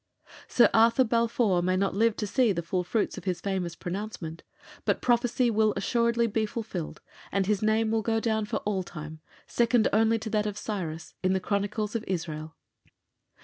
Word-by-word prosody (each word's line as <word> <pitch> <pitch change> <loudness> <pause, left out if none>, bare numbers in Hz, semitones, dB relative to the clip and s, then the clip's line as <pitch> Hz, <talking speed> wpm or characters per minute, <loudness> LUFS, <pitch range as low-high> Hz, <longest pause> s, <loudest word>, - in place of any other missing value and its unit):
Sir 240 - +5
Arthur 230 +3 +5
Balfour 230 -5 +2
may 185 +1 +1
not 195 0 +1
live 225 +2 +2
to 210 - -3
see 235 +2 +2
the 170 -3 -2
full 180 +2 -1
fruits 205 +2 -1
of 175 - -17
his 180 -2 -1
famous 185 -4 -2
pronouncement, 180 -3 -5 0.4
but - - +1
prophecy 240 0 +2
will 215 -1 +2
assuredly 235 -1 +1
be 220 -1 0
fulfilled, 210 -7 -5 0.3
and 195 0 +1
his 205 0 +1
name 220 +1 +2
will 225 0 +1
go 225 +1 0
down 220 -1 0
for - - -2
all 200 -2 0
time, 155 -3 -8 0.3
second 235 -1 +2
only 225 +1 +4
to 220 0 -5
that 210 -1 +1
of 205 0 -4
Cyrus, 170 -8 -5
in 185 0 +2
the 190 - +1
Chronicles 205 +3 -2
of 225 - -1
Israel. 160 -3 -4
210 Hz, 185 wpm, -28 LUFS, 185-225 Hz, 0.4 s, Sir